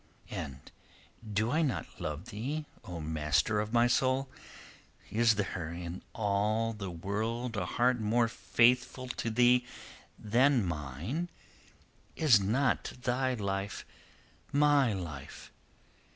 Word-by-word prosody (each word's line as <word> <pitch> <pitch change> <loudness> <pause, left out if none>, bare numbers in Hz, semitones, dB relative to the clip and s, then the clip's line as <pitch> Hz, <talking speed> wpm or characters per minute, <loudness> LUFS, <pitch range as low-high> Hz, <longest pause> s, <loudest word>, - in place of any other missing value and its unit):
"And 65 -1 -6 0.6
do 110 +3 +1
I 160 - +2
not 140 -6 -2
love 75 +9 -4
thee, 135 +8 -3 0.2
O 90 -2 -6
master 80 +7 +1
of 105 +1 -2
my 120 0 +4
soul? 130 +2 +2 0.8
Is 115 +1 +4
there 95 -5 -3
in 85 +1 -6
all 110 +2 +1
the 100 -3 -5
world 110 +7 -3
a 100 - -2
heart 125 0 +2
more 115 +2 +2
faithful 125 +2 +2
to 120 - -2
thee 125 +2 +4 0.5
than 120 +2 +3
mine? 85 - -3 0.9
Is 140 -9 +5
not 120 +8 +1
thy 130 +1 +1
life 100 -2 -3 0.7
my 145 -3 +4
life? 80 -8 -7
110 Hz, 115 wpm, -31 LUFS, 95-125 Hz, 0.9 s, Is